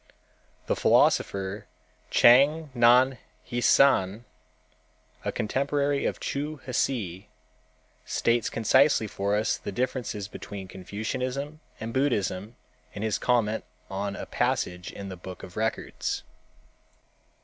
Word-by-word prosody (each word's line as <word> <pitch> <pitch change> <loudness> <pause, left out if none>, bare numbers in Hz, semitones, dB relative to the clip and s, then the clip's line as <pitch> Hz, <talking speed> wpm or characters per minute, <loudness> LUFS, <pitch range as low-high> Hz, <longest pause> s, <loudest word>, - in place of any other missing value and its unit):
The - - 0
philosopher, 100 +1 +2 0.4
Chang 145 +5 +5
Nan 125 +1 +5 0.3
hsüan, 120 -4 +3 1.0
a - - -1
contemporary 140 +4 0
of - - -3
Chu 150 +2 -3
Hsi, 110 -7 -2 0.7
states 115 0 +1
concisely 125 +2 +3
for 100 0 -1
us 105 +1 +1
the - - -5
differences 120 -2 -2
betwen 100 -2 -8
Confucianism 125 - -4 0.2
and 115 +1 -5
Buddhism 110 -5 0 0.4
in 100 - -5
his 110 -2 0
comment 115 -3 +1 0.3
on 100 +1 -3
a - - -6
passage 90 0 -1
in 100 -1 -8
the 95 - -7
_Book 90 0 -9
of - - -10
Records. - - -2
115 Hz, 105 wpm, -27 LUFS, 100-130 Hz, 1.0 s, Chang